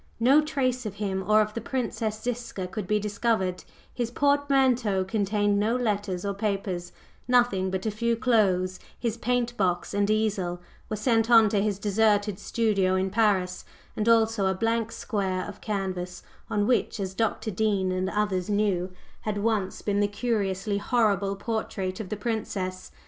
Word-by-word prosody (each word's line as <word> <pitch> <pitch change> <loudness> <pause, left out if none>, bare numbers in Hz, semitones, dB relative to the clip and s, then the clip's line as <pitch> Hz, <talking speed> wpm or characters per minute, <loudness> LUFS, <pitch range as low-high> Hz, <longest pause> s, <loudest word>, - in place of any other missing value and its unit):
No 265 +6 +6
trace 255 -5 -1
of 200 - -6
him 195 -2 -2
or 215 0 +6
of 215 0 -1
the 230 - -4
Princess 230 -3 -2
Ziska 235 -5 -4
could 190 +1 -5
be 210 - +2
discovered; 205 -3 -1 0.3
his 240 -2 -2
portmanteau 265 -7 +2
contained 205 0 +1
no 220 +3 +1
letters 205 -6 -1
or 200 - -1
papers, 195 -4 -2 0.4
nothing 240 -7 +3
but 190 +1 -3
a 220 - +1
few 235 +2 0
clothes; 195 -7 +2 0.2
his 230 -2 -1
paint 240 +1 -1
box 180 -2 0
and 200 0 +1
easel 205 -5 0 0.3
were 215 - -1
sent 225 +1 +1
on 225 -3 +7
to 200 -1 +1
his 205 -2 0
deserted 205 -1 +1
studio 200 -5 +1
in 190 0 0
Paris, 200 -4 +1 0.3
and 215 +2 0
also 225 -3 +3
a 190 - +1
blank 225 +2 0
square 190 -5 -2
of 205 - -10
canvas, 185 -4 -3 0.3
on 210 -2 +1
which, 240 -1 +1
as 190 -1 -3
Dr. 220 +1 -1
Dean 195 -2 +1
and 185 +1 -1
others 205 -3 -1
knew, 200 -3 +1 0.3
had 210 -1 -3
once 205 -2 -1
been 205 -1 0
the 205 - +3
curiously 205 -2 -1
horrible 200 -4 +1
portrait 195 -3 -3
of 210 -4 -5
the 215 - -3
Princess. 200 -5 -3
210 Hz, 165 wpm, -27 LUFS, 190-230 Hz, 0.4 s, on